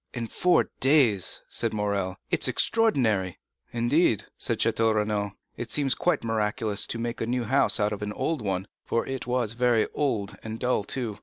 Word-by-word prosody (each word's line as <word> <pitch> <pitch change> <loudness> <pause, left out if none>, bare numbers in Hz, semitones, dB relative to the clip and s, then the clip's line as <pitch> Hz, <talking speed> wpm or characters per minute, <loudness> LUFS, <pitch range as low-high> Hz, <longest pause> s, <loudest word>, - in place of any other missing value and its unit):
"In 115 -1 -2
four 180 +10 +2
days," 130 - +3
said 115 -2 -1
Morrel; 100 -3 -1 0.2
"it - - +1
is - - +4
extraordinary!" 115 - +1 0.3
"Indeed," 120 - +2
said - - -1
Château 115 -1 +2
Renaud, 105 -1 -1 0.2
"it - - -5
seems 140 -3 +2
quite 175 -7 0
miraculous 110 -1 0
to - - -3
make 115 +1 -4
a 115 - -1
new 125 0 0
house 135 +2 +2
out 105 0 +1
of 105 - -6
an 105 0 -3
old 160 +2 -2
one; 95 -2 -2 0.2
for 115 - -1
it 135 -2 -5
was 120 -3 0
very 120 -2 +2
old, 105 -9 -1
and 110 0 -6
dull 125 -4 +1
too. 115 -5 -3
115 Hz, 180 wpm, -26 LUFS, 105-125 Hz, 0.3 s, is